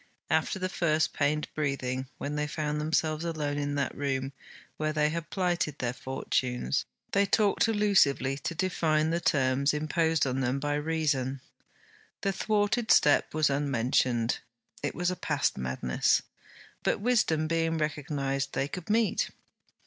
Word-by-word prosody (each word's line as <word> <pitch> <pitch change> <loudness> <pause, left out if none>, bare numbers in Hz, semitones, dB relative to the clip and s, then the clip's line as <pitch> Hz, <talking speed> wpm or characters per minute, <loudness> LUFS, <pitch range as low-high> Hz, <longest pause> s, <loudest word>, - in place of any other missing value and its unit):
After 160 +3 +1
the 185 0 -1
first 160 -4 +1
pained 150 +1 0
breathing, 135 -3 -2
when 145 +1 -4
they 150 0 -1
found 150 0 -2
themselves 155 0 0
alone 150 -4 -2
in 145 0 -2
that 145 - -1
room 135 -1 -2 0.4
where 155 0 0
they 150 -1 +2
had 165 +1 -4
plighted 175 -6 0
their 120 -1 -2
fortunes, 125 - -1 0.3
they 200 0 +3
talked 210 +1 +3
allusively 190 -11 +3
to 165 +4 -4
define 160 -3 +1
the 170 - +1
terms 140 -3 +2
imposed 160 0 +1
on 130 0 -1
them 130 +1 0
by 145 +1 -1
Reason. 145 -4 0 0.8
The 195 -1 0
thwarted 215 +3 0
step 145 +1 +4
was 155 -2 +3
unmentioned; 125 -3 +1 0.4
it 145 - -3
was 180 +1 0
a - - -2
past - - 0
madness. 65 -1 +1 0.6
But - - 0
Wisdom 200 -9 +2
being 165 0 0
recognized, 140 -3 -2
they 135 - 0
could 180 +4 -7
meet. 220 0 +2
150 Hz, 145 wpm, -29 LUFS, 135-165 Hz, 0.8 s, step